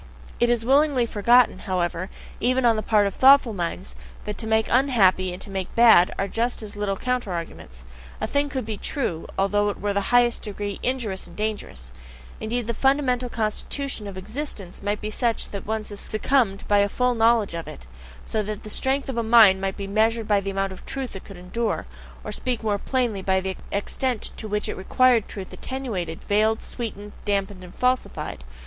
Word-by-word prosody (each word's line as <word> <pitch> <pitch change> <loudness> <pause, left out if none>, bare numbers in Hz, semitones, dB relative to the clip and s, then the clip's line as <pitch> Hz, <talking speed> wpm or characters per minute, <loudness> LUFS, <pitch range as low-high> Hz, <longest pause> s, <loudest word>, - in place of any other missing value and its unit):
It 240 - +3
is 235 -1 +1
willingly 275 -1 +4
forgotten, 235 +3 +4
however, 180 -1 -2 0.3
even 255 +2 +2
on 230 -1 +5
the 215 - -1
part 210 -2 +3
of 200 - -1
thoughtful 265 -2 +6
minds, 170 - -4 0.3
that 210 - -3
to 220 - -4
make 220 0 +2
unhappy 205 -8 +3
and 180 - -7
to 200 - -10
make 190 -2 -4
bad 225 -7 +7
are 195 - -1
just 235 +3 -2
as 210 0 -8
little 205 -1 -2
counter 250 -4 -2
arguments. 65 - -7 0.3
A - - -1
thing 285 0 0
could 260 -4 -3
be 215 -1 -4
TRUE, 200 - -2
although 205 +1 +2
it 205 - -5
were 205 - -2
in - - -1
the 200 - +1
highest 245 -1 +4
degree 205 -1 -4
injurious 235 -7 -2
and - - -14
dangerous; 205 - -4 0.5
indeed, 235 +2 -2
the 235 - -2
fundamental 255 -1 +1
constitution 225 +2 -3
of 195 -1 -7
existence 210 -3 -5
might 205 +1 -2
be 215 - -4
such 230 +1 -1
that 200 -1 -7
one 220 0 -1
succumbed 215 +1 0
by 205 0 +4
a 200 0 +3
full 250 +3 +1
knowledge 225 -3 +3
of 165 -1 -5
it 65 -1 -10 0.4
so 220 - -1
that 210 0 -5
the 215 - -7
strength 270 +4 0
of 265 -3 -4
a - - +2
mind 220 -4 +6
might 195 0 -2
be 200 - -4
measured 220 +2 +1
by 205 -1 +3
the 195 0 -4
amount 195 0 -1
of 190 - -10
"truth" 265 -5 -5
it 195 - -8
could 195 - -11
endure 210 +5 -2 0.4
or - - -5
to - - -2
speak 245 -3 -2
more 205 -2 0
plainly, 240 -6 -1
by 190 0 +2
the 190 0 -3 0.2
extent 235 +4 -1
to 220 - -3
which 210 0 -2
it - - -3
REQUIRED 240 +3 +3
truth 195 -2 -8
attenuated, 210 -12 -4
veiled, 215 +2 +2
sweetened, 210 -4 -6
damped, 200 -1 0
and 185 -2 -12
falsified. 250 - -1
215 Hz, 200 wpm, -24 LUFS, 195-240 Hz, 0.5 s, bad